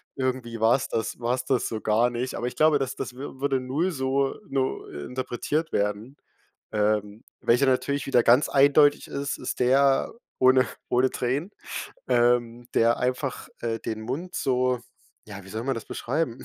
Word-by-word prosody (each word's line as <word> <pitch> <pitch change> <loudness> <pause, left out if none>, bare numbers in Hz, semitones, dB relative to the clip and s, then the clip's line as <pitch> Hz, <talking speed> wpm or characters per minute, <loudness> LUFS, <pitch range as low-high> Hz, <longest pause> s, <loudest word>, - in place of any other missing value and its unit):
irgendwie 125 -3 -2
war's 115 +4 +3
das 115 - -2
war 120 +2 0
's 130 - -5
das 130 -3 +1
so 110 - -4
gar 110 +3 +3
nicht.“ 125 +2 -3
Aber 120 - -2
ich - - -5
glaube, 155 -2 +4
das 135 -1 -2
das - - -5
wür 135 0 -8
würde 135 -1 +1
0 145 +9 -1
so 135 -2 0
no 135 -1 -1
interpretiert 130 - -3
werden. 105 +7 -2 0.6
Ähm, 105 0 0 0.2
welcher 125 +4 +3
natürlich 140 +2 +1
wieder 125 -3 +3
ganz 125 +5 +5
eindeutig 145 +1 +4
ist, 140 0 -3
ist - - -5
der 135 +2 +3 0.3
ohne 130 0 +5 0.2
ohne 125 +1 +3
Tränen, 140 +10 -2 0.6
ähm, 120 0 +2
der 115 +1 +4
einfach, 125 +2 -2
äh, 115 -1 -2
den 110 0 -5
Mund 140 +11 -5
so, 125 -1 +1 0.4
ja, 100 -2 -10
wie 95 - -13
soll 110 +3 -4
man 135 +1 -1
das 115 - -6
beschreiben, 135 -1 -3
125 Hz, 170 wpm, -26 LUFS, 115-135 Hz, 0.6 s, ganz